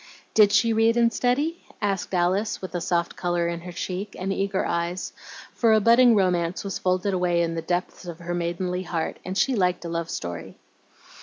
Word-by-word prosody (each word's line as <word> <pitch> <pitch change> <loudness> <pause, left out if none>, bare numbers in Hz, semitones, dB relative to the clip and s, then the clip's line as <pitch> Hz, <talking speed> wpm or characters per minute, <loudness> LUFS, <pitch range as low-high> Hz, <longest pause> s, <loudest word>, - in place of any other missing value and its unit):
"Did 210 -2 +6
she 225 +2 +3
read 225 +1 +3
and 235 -1 +3
study?" 285 +9 0 0.2
asked 200 -3 -1
Alice, 185 +4 +1
with 185 - -7
a 175 - -2
soft 170 0 -1
color 175 -1 0
in 170 0 -3
her 180 +1 -8
cheek, 190 +3 -5
and 195 +1 -2
eager 195 0 -1
eyes, 170 +2 -2 0.4
for 230 -2 +3
a 220 - +5
budding 235 +2 +6
romance 180 -3 +1
was 195 -2 -4
folded 185 +2 0
away 175 -2 +2
in 165 0 -1
the 165 - -3
depths 175 +2 -3
of 170 -2 -7
her 175 0 -5
maidenly 175 +1 -2
heart, 170 -3 -3
and 185 +1 -4
she 270 - +2
liked 180 -3 0
a - - -4
love 165 0 -3
story. 85 -1 -6
185 Hz, 200 wpm, -25 LUFS, 175-205 Hz, 0.4 s, Did